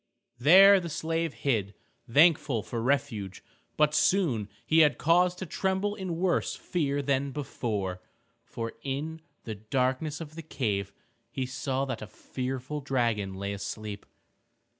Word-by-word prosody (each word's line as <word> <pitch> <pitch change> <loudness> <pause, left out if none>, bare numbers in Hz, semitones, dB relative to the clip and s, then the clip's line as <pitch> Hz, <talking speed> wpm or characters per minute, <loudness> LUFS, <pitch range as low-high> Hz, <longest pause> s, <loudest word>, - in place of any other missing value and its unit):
There 190 +8 +8
the 170 -2 -5
slave 165 +1 -1
hid, 105 -8 -1 0.4
thankful 145 -5 +4
for 115 - -4
refuge. 115 -7 -1 0.3
But 150 0 +3
soon 150 - +2 0.2
he 160 - +4
had 150 -2 +5
cause 175 +2 +3
to 185 - -6
tremble 190 +3 -1
in 185 -5 -4
worse 180 0 +1
fear 145 -5 -1
than 140 0 +1
before, 110 -10 -3 0.4
for 115 -1 -5
in 150 +5 -4 0.2
the 110 - -5
darkness 130 +7 -1
of 155 -2 -8
the 165 - -7
cave 105 - -2 0.4
he 130 - -3
saw 130 +1 -2
that 130 -4 -4
a 110 - -6
fearful 130 +7 -5
dragon 115 -8 0
lay 100 +1 -3
asleep. 100 +1 -6
135 Hz, 140 wpm, -28 LUFS, 115-160 Hz, 0.4 s, There